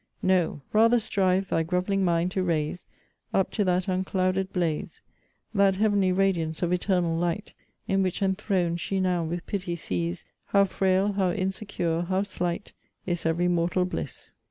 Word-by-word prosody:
No 180 -5 +2
rather 230 +3 +5
strive 190 -3 +1
thy - - +2
grov'ling 180 +4 0
mind 175 0 +1
to 190 -1 -1
raise 165 -1 -1 0.5
Up 190 - +2
to 210 - 0
that 180 +1 +1
unclouded 185 0 0
blaze, 170 -4 -2 0.5
That 195 -2 +4
heav'nly 200 -2 +2
radiance 180 -4 0
of 175 - +1
eternal 180 -2 +1
light, 175 +5 -2 0.3
In 195 0 +2
which 185 -2 -1
enthron'd 190 -3 0
she 195 +3 -2
now 180 -2 +1
with 170 +2 -4
pity 185 -3 -3
sees, 85 - -3 0.2
How 200 0 +4
frail, 190 +1 +1
how 190 -2 +1
insecure, 185 -3 -2
how 185 +2 0
slight, 180 -1 -3 0.3
Is 175 -2 -1
every 170 +2 +1
mortal 175 +1 +1
bliss. 180 - -6
185 Hz, 155 wpm, -27 LUFS, 170-195 Hz, 0.5 s, rather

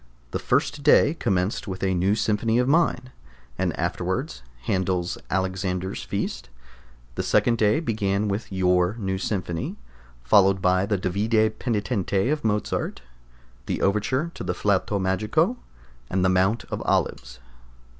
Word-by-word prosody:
The - - -2
first 145 - 0
day 145 +1 +5
commenced 95 - -1
with 95 -1 -5
a 95 -1 +2
new 95 +3 +2
Symphony 110 +1 +1
of 125 0 +2
mine, 140 -4 +2 0.4
and - - 0
afterwards 60 - -2 0.2
Handel's 95 -3 -1
Alexander's 95 0 -2
Feast. - - -4 0.6
The - - -2
second 115 -2 +2
day 105 +5 +3
began 105 -7 -1
with 100 +2 -3
your 90 0 +2
new 95 -3 -2
Symphony, 90 -5 -3 0.5
followed 95 +9 +5
by 95 +1 +2
the 105 -1 +1
Davide 110 +4 +1
Penitente 105 -1 0
of 150 -1 -1
Mozart, 105 - -1 0.6
the - - -2
overture 130 +11 +1
to - - -7
the 90 -1 -2
Flaute 100 0 +1
Magico, 95 +2 +1 0.5
and 95 0 +1
the - - +4
Mount 95 +5 +2
of - - -3
Olives. - - -1
100 Hz, 135 wpm, -24 LUFS, 95-110 Hz, 0.6 s, day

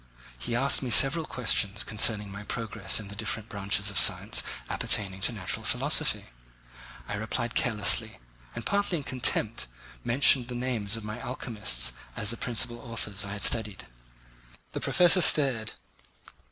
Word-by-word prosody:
He 115 - -4
asked 135 +3 +3
me 130 - -4
several 140 +7 +4
questions 110 -4 0
concerning 105 -1 +1
my 100 +1 -8
progress 105 -2 -3
in 105 - -9
the 100 - -9
different 110 0 -4
branches 100 0 -2
of 100 - +1
science - - +2 0.3
appertaining 95 -2 -2
to 105 - +1
natural 100 -6 -5
philosophy. - - +2 0.8
I - - -5
replied 110 +3 -3
carelessly, 110 -1 +2 0.4
and 115 - -7
partly 200 -3 0
in 145 - -6
contempt, 115 - -1 0.4
mentioned 125 0 +3
the 125 - -7
names 120 -5 -1
of 110 - -9
my 105 +3 -7
alchemists 105 - -1 0.2
as 105 +1 +1
the 115 - -5
principal 120 0 -2
authors 110 -5 -4
I 100 0 -6
had 105 - -3
studied. 110 -4 +1 0.9
The - - -5
professor 180 +1 +4
stared. 135 -9 +4
110 Hz, 150 wpm, -27 LUFS, 105-125 Hz, 0.9 s, several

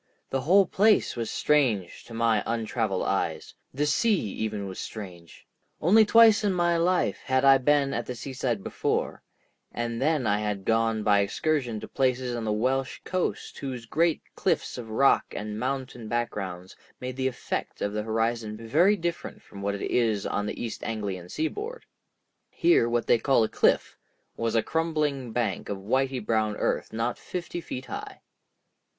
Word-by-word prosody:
The 135 - 0
whole 190 +8 +5
place 210 +4 +3
was 115 -1 -3
strange 120 -12 +1
to 120 - -11
my 115 -2 +2
untraveled 115 -3 -1
eyes; - - -2 0.2
the 145 +3 -1
sea 200 +7 +2
even 105 -2 -3
was 95 - -7
strange. 90 -6 -9 0.3
Only 215 +7 +6
twice 225 -2 +7
in 200 -2 +2
my 175 -1 +2
life 170 - +1
had 130 0 +1
I 135 -1 +7
been 140 +1 +2
at 120 - -3
the 125 - -4
seaside 125 -4 -3
before, - - -2 0.5
and 120 0 -3
then 150 -2 +2
I 105 -1 +2
had 105 -2 -3
gone 115 -1 +1
by 100 -1 +4
excursion 120 +3 0
to - - -7
places 130 -2 0
on 115 -1 -3
the 110 - 0
Welsh 130 +5 0
coast 185 0 -3
whose 130 -4 -5
great 165 +6 +1
cliffs - - -1
of 120 -2 -7
rock 135 +5 +4
and 105 0 -4
mountain 130 -2 -3
backgrounds 95 -6 -3 0.2
made 125 0 -5
the 130 0 0
effect 125 - -4
of 100 - -2
the 105 - -1
horizon 110 0 -1
very 155 - +3
different 170 -2 -4
from 100 - -11
what 100 0 -1
it 100 - -6
is 110 -4 +1
upon 105 0 -1
the - - -5
East 115 - -5
Anglian 100 -5 -4
seaboard. 425 - -4 0.6
Here 335 - +3
what 120 0 0
they 120 - +4
call 135 -3 +3
a - - +1
cliff - - +1 0.4
was 115 0 -1
a 110 - +3
crumbling 150 -6 -1
bank 110 -5 -2
of 100 - -2
whitey 130 +4 -1
brown 110 -2 +1
earth - - -1
not 115 +2 -2
fifty 175 -1 -5
feet 130 -5 -6
high. - - -7
120 Hz, 170 wpm, -27 LUFS, 110-145 Hz, 0.6 s, twice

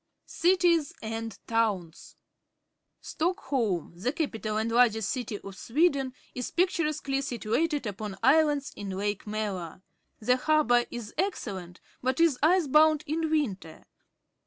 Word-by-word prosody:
Cities 345 -3 +2
and 225 -1 -4
Towns. 205 -8 -1 0.4
— - - -53
Stockholm, 265 - -1
the 195 +9 -1
cap 305 -2 -2
ital 215 -1 -3
and 220 +1 -1
largest 225 -3 +3
city 245 -5 -3
of 195 -1 -9
Sweden, 270 - +1 0.2
is 250 - -4
pictu 360 -1 +1
resquely 275 -2 -1
situated 275 +4 -1
upon 205 -1 -5
islands 295 -2 +3
in 200 -1 -6
Lake 205 +2 -3
Malar. 195 -5 -4 0.4
The 250 +3 +2
harbour 255 -4 +3
is 235 -3 -7
excellent, 195 - -3 0.2
but 260 +3 0
is 330 -6 +3
ice 345 +3 +4
bound 305 +2 +4
in 320 +2 -1
winter. 205 - -2
250 Hz, 135 wpm, -28 LUFS, 210-310 Hz, 0.4 s, ice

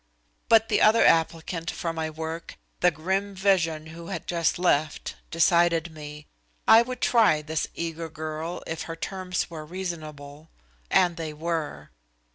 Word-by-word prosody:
But 225 -1 +6
the - - +2
other 220 +2 +6
applicant 165 +1 +1
for 165 -1 -3
my 160 -1 -2
work, 160 +1 -6 0.2
the 180 - +5
grim 190 +5 -2
vision 175 -5 +1
who 170 0 -9
had 185 -4 -5
just 170 -2 0
left, 155 -4 0 0.2
decided 170 0 +3
me. 150 -1 -9 0.4
I 225 - +9
would 250 +1 -5
try 215 -11 +4
this 155 +1 -2
eager 165 -1 -4
girl 155 +2 -5
if 160 0 -4
her 165 - -4
terms 180 +1 -3
were 160 -2 -6
reasonable 155 -4 -7 0.4
and 175 -2 +3
they 160 -2 -4
were. 150 - -4
165 Hz, 145 wpm, -26 LUFS, 155-180 Hz, 0.4 s, I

